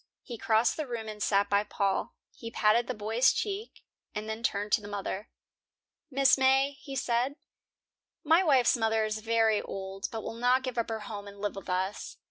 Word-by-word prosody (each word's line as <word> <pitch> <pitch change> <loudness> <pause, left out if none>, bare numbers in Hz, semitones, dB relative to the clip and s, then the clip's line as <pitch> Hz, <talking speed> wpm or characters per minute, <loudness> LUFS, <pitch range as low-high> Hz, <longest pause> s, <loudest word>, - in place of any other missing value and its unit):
He 240 - -7
crossed 220 +1 +2
the 310 -3 -3
room 230 -3 -5
and 210 -1 -7
sat 200 -1 +2
by 200 +1 +2
Paul. 200 -2 -1 0.2
He 230 - -8
patted 230 +1 +2
the - - -3
boy's 220 +5 +3
cheek, 415 +2 -4 0.3
and 210 +1 -4
then 220 +1 -4
turned 205 -2 -1
to 215 - +3
the 205 - -9
mother. 205 0 -4 0.8
"Mrs. 270 0 +4
May," 265 +1 +4
he 275 -2 -7
said, 250 +2 0 0.9
"my 325 +4 +5
wife's 270 -8 +4
mother 225 -2 +1
is 215 0 -3
very 225 -1 +2
old, 195 0 -5
but 225 -1 -5
will - - -5
not 250 +3 +2
give 255 -2 -3
up 230 - -1
her 220 -1 -3
home 205 -1 -7
and 200 0 -11
live 205 0 -3
with 195 -1 -8
us. 185 +2 -2
220 Hz, 195 wpm, -29 LUFS, 205-250 Hz, 0.9 s, my